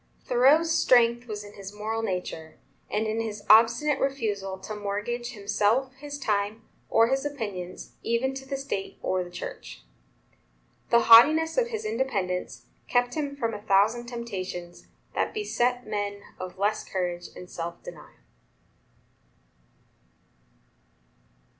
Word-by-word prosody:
Thoreau's 280 Hz, +7 st, +4 dB
strength 240 Hz, -6 st, +4 dB
was 210 Hz, -2 st, -5 dB
in 205 Hz, 0 st, -12 dB
his 195 Hz, -1 st, -9 dB
moral 215 Hz, +2 st, -3 dB
nature, 180 Hz, -6 st, -4 dB, 0.3 s
and 215 Hz, +1 st, 0 dB
in 220 Hz, +1 st, -1 dB
his 210 Hz, -2 st, -5 dB
obstinate 235 Hz, +7 st, +5 dB
refusal 205 Hz, -8 st, -1 dB
to 200 Hz, +3 st, -7 dB
mortgage 210 Hz, +4 st, -3 dB
himself, 215 Hz, +5 st, +1 dB
his 285 Hz, +1 st, -7 dB
time, 210 Hz, -3 st, -1 dB, 0.3 s
or 230 Hz, +1 st, +4 dB
his 270 Hz, +1 st, +1 dB
opinions, 205 Hz, -11 st, -5 dB
even 235 Hz, +3 st, 0 dB
to 270 Hz, 0 st, -8 dB
the 275 Hz, -, -2 dB
State 235 Hz, -8 st, -4 dB
or 185 Hz, 0 st, 0 dB
the 175 Hz, -, -10 dB
Church. 175 Hz, -, -8 dB, 1.1 s
The 235 Hz, -, +5 dB
haughtiness 305 Hz, +9 st, +7 dB
of -, -, +2 dB
his 445 Hz, -2 st, -5 dB
independence 200 Hz, -, -2 dB, 0.2 s
kept 245 Hz, 0 st, +2 dB
him 285 Hz, -2 st, -3 dB
from 230 Hz, -5 st, -2 dB
a 205 Hz, -, -6 dB
thousand 215 Hz, +4 st, +2 dB
temptations 185 Hz, -7 st, -6 dB, 0.3 s
that -, -, -1 dB
beset 250 Hz, -, 0 dB
men 205 Hz, -1 st, -3 dB, 0.2 s
of 185 Hz, 0 st, -7 dB
less 205 Hz, +2 st, 0 dB
courage 175 Hz, -2 st, -3 dB
and 180 Hz, -, -9 dB
self 170 Hz, 0 st, -6 dB
denial. -, -, -12 dB
225 Hz, 130 wpm, -27 LUFS, 200-260 Hz, 1.1 s, haughtiness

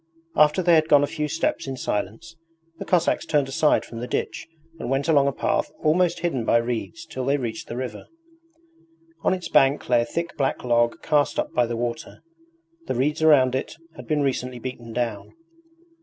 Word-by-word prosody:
After 150 Hz, +4 st, +4 dB
they 175 Hz, 0 st, +4 dB
had 155 Hz, -1 st, +4 dB
gone 145 Hz, -1 st, +6 dB
a -, -, +4 dB
few 150 Hz, +1 st, -3 dB
steps 165 Hz, -2 st, -1 dB
in 135 Hz, -1 st, -4 dB
silence 105 Hz, -, -4 dB, 0.4 s
the -, -, -5 dB
Cossacks 175 Hz, -2 st, +2 dB
turned 145 Hz, -3 st, +1 dB
aside 150 Hz, +2 st, +2 dB
from 115 Hz, -, -8 dB
the 120 Hz, -, -5 dB
ditch -, -, -3 dB, 0.3 s
and -, -, -4 dB
went 135 Hz, +3 st, 0 dB
along 145 Hz, -4 st, +4 dB
a -, -, +2 dB
path -, -, -1 dB
almost 170 Hz, +2 st, +2 dB
hidden 160 Hz, -9 st, -1 dB
by 115 Hz, -, +3 dB
reeds 120 Hz, +8 st, -3 dB
till 130 Hz, -5 st, -5 dB
they 140 Hz, +3 st, +1 dB
reached 115 Hz, -5 st, -5 dB
the 115 Hz, -, -6 dB
river. 125 Hz, -5 st, -6 dB, 1.1 s
On -, -, +2 dB
its 180 Hz, -2 st, -2 dB
bank 135 Hz, +2 st, +3 dB
lay 120 Hz, -1 st, +4 dB
a -, -, -1 dB
thick 170 Hz, +5 st, -4 dB
black 135 Hz, -2 st, -1 dB
log 120 Hz, -1 st, +1 dB
cast 145 Hz, -2 st, +1 dB
up -, -, -2 dB
by 120 Hz, -1 st, +2 dB
the 115 Hz, 0 st, -3 dB
water. 120 Hz, +6 st, -5 dB, 0.6 s
The -, -, -1 dB
reeds 150 Hz, +6 st, 0 dB
around 140 Hz, -5 st, +5 dB
it 130 Hz, +4 st, -3 dB, 0.2 s
had 125 Hz, -2 st, -11 dB
been 150 Hz, -1 st, +1 dB
recently 125 Hz, -2 st, -2 dB
beaten 120 Hz, -1 st, -7 dB
down. 115 Hz, -3 st, -3 dB
135 Hz, 195 wpm, -24 LUFS, 120-155 Hz, 1.1 s, gone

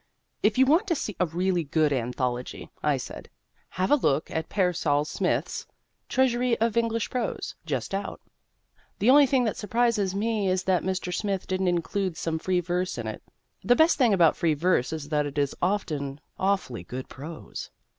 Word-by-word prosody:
If 210 Hz, +2 st, +2 dB
you 265 Hz, -, +6 dB
want 330 Hz, +10 st, +3 dB
to 340 Hz, -, +1 dB
see 215 Hz, -8 st, -4 dB
a 180 Hz, -, +2 dB
really 175 Hz, +1 st, 0 dB
good 150 Hz, 0 st, +1 dB
anthology 125 Hz, 0 st, -3 dB
(I -, -, +2 dB
said) -, -, -8 dB, 0.4 s
have 185 Hz, +1 st, -1 dB
a -, -, +8 dB
look 150 Hz, -, 0 dB
at 160 Hz, 0 st, -3 dB
Pearsall 165 Hz, -7 st, +1 dB
Smith's -, -, -2 dB, 0.4 s
"Treasury 250 Hz, -2 st, +2 dB
of 230 Hz, -1 st, +1 dB
English 230 Hz, -1 st, 0 dB
Prose," 245 Hz, -3 st, -3 dB
just 135 Hz, +1 st, -2 dB
out. 195 Hz, 0 st, -3 dB, 0.8 s
The 240 Hz, -, +4 dB
only 285 Hz, 0 st, +7 dB
thing 260 Hz, -1 st, +2 dB
that 220 Hz, -, -1 dB
surprises 215 Hz, -3 st, +1 dB
me 210 Hz, -1 st, 0 dB
is 185 Hz, 0 st, +1 dB
that 185 Hz, -2 st, +2 dB
Mr. 185 Hz, -1 st, -2 dB
Smith 195 Hz, -2 st, -2 dB
didn't 185 Hz, 0 st, -1 dB
include 175 Hz, +1 st, -1 dB
some 160 Hz, -1 st, -2 dB
free 180 Hz, +1 st, +1 dB
verse 180 Hz, +2 st, -2 dB
in -, -, -4 dB
it. -, -, -5 dB, 0.4 s
The 245 Hz, -, +4 dB
best 320 Hz, +1 st, +4 dB
thing 245 Hz, -4 st, +5 dB
about 175 Hz, -5 st, +5 dB
free 160 Hz, -3 st, +1 dB
verse 155 Hz, -5 st, +1 dB
is 155 Hz, -2 st, -5 dB
that 150 Hz, -1 st, +1 dB
it 145 Hz, -, -8 dB
is 140 Hz, -1 st, +1 dB
often 150 Hz, -8 st, -1 dB, 0.2 s
awfully 190 Hz, -, 0 dB
good 130 Hz, +1 st, -6 dB
prose. 155 Hz, +4 st, -8 dB
185 Hz, 180 wpm, -26 LUFS, 155-220 Hz, 0.8 s, a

